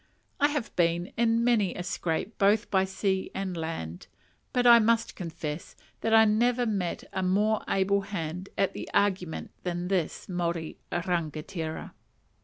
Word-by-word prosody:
I 290 - +5
have 290 -7 -3
been 170 +1 +1
in 230 0 +2
many 225 -6 +2
a 175 - -4
scrape 175 +3 -3
both 205 +3 +3
by 190 -1 +3
sea 190 0 -1
and 190 -2 -3
land, 160 - -5 0.4
but 245 -1 +1
I 235 -1 +9
must 230 +1 +2
confess 160 -3 -6 0.2
that 225 - -1
I 220 0 +7
never 240 +3 +2
met 195 -6 -2
a 190 - -1
more 210 +4 +2
able 195 +1 +2
hand 180 -2 -5
at 195 - +1
an - - -5
argument 185 -5 0
than 175 0 -3
this 185 -5 -1
Maori 170 -3 -2
rangatira. 165 -1 -3
190 Hz, 150 wpm, -28 LUFS, 170-215 Hz, 0.4 s, I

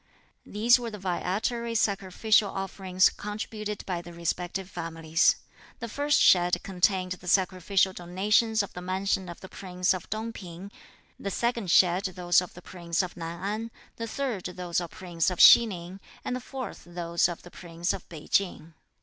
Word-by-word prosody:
These 235 +4 +4
were 235 -1 -4
the 210 - -8
viatory 210 +5 -2
sacrificial 200 +1 +2
offerings 190 -1 +1
contributed 210 0 -5
by 180 -3 -3
the 175 0 -11
respective 175 +2 -3
families. 165 -3 +1 0.4
The 235 - -5
first 290 +5 +1
shed 175 -1 +5
contained 185 0 +1
the 180 0 -6
sacrificial 190 +1 +2
donations 205 +5 +1
of 200 - -8
the 180 - -7
mansion 190 0 -1
of 170 - -9
the 190 - -9
Prince 180 -1 -1
of 185 - -7
Tung 220 +2 -3
P'ing; 185 +1 -9 0.5
the 200 - -3
second 235 -1 -1
shed 180 +2 +4
those 180 -1 +2
of 180 - -9
the 180 - -12
Prince 170 -1 -2
of 180 - -6
Nan 170 +1 -6
An; 215 +3 -3 0.3
the 230 - -4
third 235 -5 -3
those 180 -1 -2
of 170 - -5
the - - -17
Prince 175 -2 -1
of 180 - -5
Hsi 235 - +10
Ning, 180 -1 -7 0.3
and 250 - -1
the 255 - -4
fourth 260 0 -7
those 175 0 0
of 175 - -7
the 175 - -13
Prince 170 0 -3
of - - -8
Pei 160 -3 -10
Ching. 170 -4 0
185 Hz, 175 wpm, -28 LUFS, 175-210 Hz, 0.5 s, Hsi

